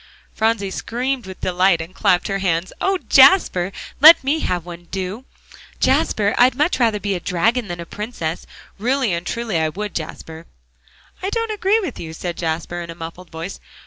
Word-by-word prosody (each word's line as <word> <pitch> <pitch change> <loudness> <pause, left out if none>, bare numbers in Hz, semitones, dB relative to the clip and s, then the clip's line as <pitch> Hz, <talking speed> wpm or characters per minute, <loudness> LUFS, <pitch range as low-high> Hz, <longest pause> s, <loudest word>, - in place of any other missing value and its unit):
Phronsie 220 -3 0
screamed 250 +2 -3
with 190 - -10
delight 180 -1 +2
and 165 +3 -7
clapped 180 -1 +2
her 195 -1 -2
hands. 180 -2 -1
"Oh, 385 0 +2
Jasper! 265 - +5 0.3
let 315 +2 +9
me 285 +4 +1
have 175 - -2
one 175 -1 -8
on, 175 - -23
do, 195 +6 -5 0.5
Jasper! 205 -1 +2
I'd 250 +1 +5
much 300 +2 +1
rather 225 -4 +2
be 200 -1 -2
a 180 - -2
dragon 215 +7 0
than 175 -1 -6
a 170 - -6
princess. 180 -4 -5 0.3
Really 250 -1 +1
and 170 +1 -3
truly 230 -7 -2
I 160 0 +1
would, 205 +5 -5
Jasper." 160 0 -7 0.7
"I 380 - -2
don't 455 +1 -2
agree 420 +1 +2
with 355 - -5
you," 160 -1 -7
said 170 +1 -5
Jasper, 170 +1 -3
in 170 - -8
a 165 - -7
muffled 165 +2 -9
voice. 165 +4 -7
195 Hz, 185 wpm, -20 LUFS, 170-250 Hz, 0.7 s, let